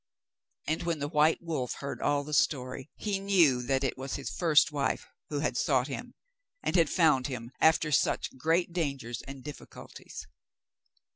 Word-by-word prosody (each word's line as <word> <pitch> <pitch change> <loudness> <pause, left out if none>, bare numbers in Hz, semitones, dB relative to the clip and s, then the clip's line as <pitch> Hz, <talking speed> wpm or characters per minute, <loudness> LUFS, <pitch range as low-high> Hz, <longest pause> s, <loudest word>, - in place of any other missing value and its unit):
And 160 - -1
when 170 -1 -1
the 145 0 -3
white 155 +2 +3
wolf 155 -7 -2
heard 140 - -6
all 145 0 +1
the 150 +1 -7
story, 130 -1 0
he 205 -2 -2
knew 175 -10 +4
that 135 +2 0
it 130 -1 -2
was 135 +1 -4
his 140 - -5
first 160 -5 +4
wife, 145 -2 -1 0.2
who 145 -1 -2
had 145 -5 0
sought 130 -1 +2
him, 245 - -6 0.5
and - - -1
had 165 -4 +4
found 150 -7 +3
him, 125 -3 -6
after 160 -1 +4
such 140 - +1
great 165 +5 +1
dangers 140 -8 -3
and 135 -1 -9
difficulties. 150 -1 -10
145 Hz, 165 wpm, -29 LUFS, 135-165 Hz, 0.5 s, knew